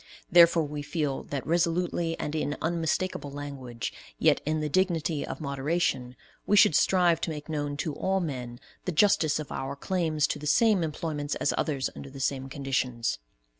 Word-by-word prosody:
Therefore 170 -1 +7
we 150 0 -4
feel 145 -2 -2
that 140 -2 -4
resolutely 170 0 0
and 150 - -3
in 150 -2 -1
unmistakable 165 -1 -1
language, 140 -4 -6 0.2
yet - - +3
in 155 0 +1
the 155 - -1
dignity 165 -3 +1
of - - -6
moderation, 140 -3 -1 0.3
we 205 - +4
should 180 - +7
strive 175 0 +3
to - - -1
make 150 -2 -6
known 145 -2 -3
to 155 -1 -2
all 190 +6 0
men 125 -8 -4 0.3
the 180 - -1
justice 165 -3 +3
of 155 -2 -6
our 135 +1 -4
claims 160 -1 0
to - - -2
the 150 - -5
same 215 +4 +4
employments 155 -2 -3
as - - 0
other's 140 -4 0
under 140 - -8
the 135 0 -10
same 135 0 -1
conditions. 130 - -1
150 Hz, 170 wpm, -28 LUFS, 140-170 Hz, 0.3 s, Therefore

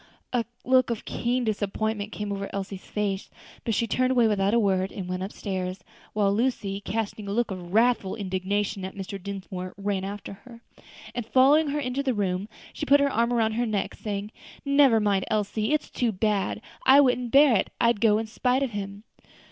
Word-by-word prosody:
A 240 -2 +1 0.2
look 255 0 +4
of 230 -2 -3
keen 245 +1 -1
disappointment 215 0 -2
came 210 -1 -4
over 200 0 -3
Elsie's 195 -1 -5
face, 200 -2 -2 0.3
but 225 - 0
she 235 - +1
turned 255 +3 +1
away 245 -3 +4
without 205 0 +2
a - - +5
word 190 -3 +1
and 190 -3 -6
went 185 0 -3
upstairs; 185 -2 -4 0.3
while 205 -2 +2
Lucy, 205 -4 -1
casting 210 0 -3
a - - -3
look 230 +1 0
of 180 -2 -7
wrathful 225 -2 +2
indignation 195 0 -2
at 190 - -6
Mr. 195 0 -6
Dinsmore, 185 -1 -6
ran 200 -1 -2
after 200 +1 -6
her, 230 +3 -14 0.5
and 240 - -3
following 275 +7 +4
her 290 +1 -1
into 260 0 -2
her 265 -2 +1
room, 195 -1 -1 0.2
she 300 - -5
put 285 +1 +6
her 280 0 +2
arm 235 +1 +2
round 225 -2 +2
her 240 +2 0
neck, 210 -2 -1
saying, 205 0 -5 0.3
"Never 280 -5 +5
mind, 200 -3 +1
Elsie; 215 +2 0
it's 305 - 0
too 240 -2 0
bad, 205 0 0
and - - -14 0.3
I 275 - +8
wouldn't 250 -3 +3
bear 275 -1 +6
it. - - -1
I'd 235 -3 +2
go 215 -2 +5
in 225 - -2
spite 250 +4 0
of 265 - -2
him." 200 0 -6
210 Hz, 195 wpm, -26 LUFS, 195-240 Hz, 0.5 s, I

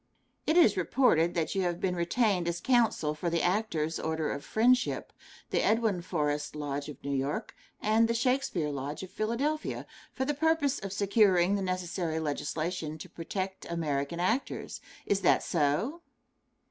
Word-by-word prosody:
It 315 - +3
is 220 - +6
reported 175 - +3
that 165 -2 0
you 195 - 0
have 175 -1 -1
been 180 -2 0
retained 180 +1 +1
as 170 0 -1
counsel 230 - +2
for 170 +3 -2
the 170 0 0
Actors' 175 -5 0
Order 160 -1 -1
of 140 - -4
Friendship 245 +8 +2 0.4
the - - +2
Edwin 220 -5 +2
Forrest 150 -4 -2
Lodge 145 -1 -3
of 145 - -10
New 140 0 -1
York, 145 - -2 0.2
and 220 +2 +3
the 230 - 0
Shakespeare 235 - 0
Lodge 140 +4 -4
of 185 - -9
Philadelphia 245 +10 -2 0.3
for 265 - -2
the 295 - 0
purpose 295 -2 +1
of 195 -1 -6
securing 195 -2 +3
the 200 - 0
necessary 180 -3 -2
legislation 155 +1 -3
to - - -9
protect 190 +3 -5
American 155 -1 -2
actors 225 +10 -1 0.2
is 200 -1 +1
that - - +4
so? 170 - 0
180 Hz, 160 wpm, -30 LUFS, 155-225 Hz, 0.4 s, is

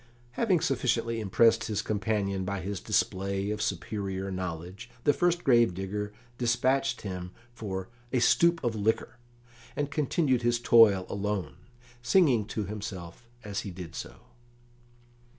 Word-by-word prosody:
Having 185 - +1
sufficiently 115 -3 0
impressed 115 +2 +3
his 105 -1 -2
companion 100 -2 -1
by 100 +1 -3
his 100 +1 -4
display 100 +3 0
of 105 0 -3
superior 95 0 -3
knowledge, 90 +4 -5
the 145 - +4
first 175 +1 +1
grave 120 -8 +4
digger 105 +2 -4 0.3
despatched 125 +3 +1
him 90 -3 -5 0.2
for 95 -5 -5 0.2
"a 130 - +1
stoup 170 +7 +4
of 120 -2 0
liquor," 110 +2 -1 0.6
and 145 -1 -2
continued 140 -3 +1
his 120 0 +1
toil 115 -6 +6
alone, 100 -1 -3 0.4
singing 125 - +4
to 110 -1 -3
himself 100 0 -7
as 105 -2 -3
he 100 - -5
did 90 -2 -8
so. - - -7
105 Hz, 135 wpm, -29 LUFS, 95-120 Hz, 0.6 s, toil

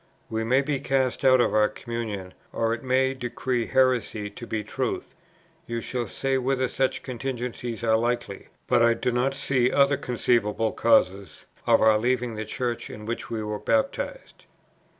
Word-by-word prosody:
We 110 0 -1
may 130 +4 +3
be 140 -1 -1
cast 130 -2 0
out 130 -1 +6
of - - +1
our 105 0 +4
communion, 105 -5 -5 0.2
or 115 0 0
it 115 - -4
may 130 +1 +2
decree 125 -1 -2
heresy 125 -5 +1
to 120 +3 -9
be 110 -1 -2
truth, 105 - -3 0.5
you 115 0 -2
shall 120 0 -3
say 135 +5 -1
whether 130 0 0
such 130 +1 -1
contingencies 125 -2 -4
are 110 -1 +3
likely; 115 -3 -2 0.2
but - - +3
I 115 0 +5
do 125 - -1
not 125 +3 0
see 130 -2 +1
other 140 0 +4
conceivable 115 -4 0
causes 100 -6 +1 0.2
of - - +5
our 110 -1 +5
leaving 125 0 0
the 110 0 -4
Church 120 -1 -3
in 105 - -9
which 115 +2 -4
we 110 -2 -3
were 105 0 -3
baptized. 285 - -2
120 Hz, 170 wpm, -26 LUFS, 110-130 Hz, 0.5 s, out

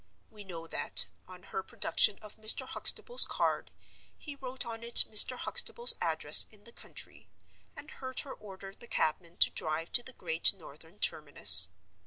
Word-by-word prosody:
We 210 -2 -15
know 170 -4 -12
that, - - -3 0.2
on - - -18
her 450 - -9
production 210 - -2
of 210 - -15
Mr. 215 0 +2
Huxtable's 485 +1 0
card, - - -6 0.5
he 290 -2 -14
wrote 260 -1 -9
on 230 -1 -11
it 235 0 +2
Mr. 220 +4 +6
Huxtable's 475 - -1
address - - +3
in 210 -1 -23
the 235 - -17
country, - - -13 0.5
and - - -15
heard 260 -1 -9
her 275 - -14
order 195 -1 -15
the 240 - -17
cabman 170 0 -6
to - - 0
drive 160 +1 -8
to - - -2
the 260 +2 -13
Great 165 0 -1
Northern 160 +1 -16
terminus. 100 - +6
210 Hz, 165 wpm, -26 LUFS, 165-245 Hz, 0.5 s, Mr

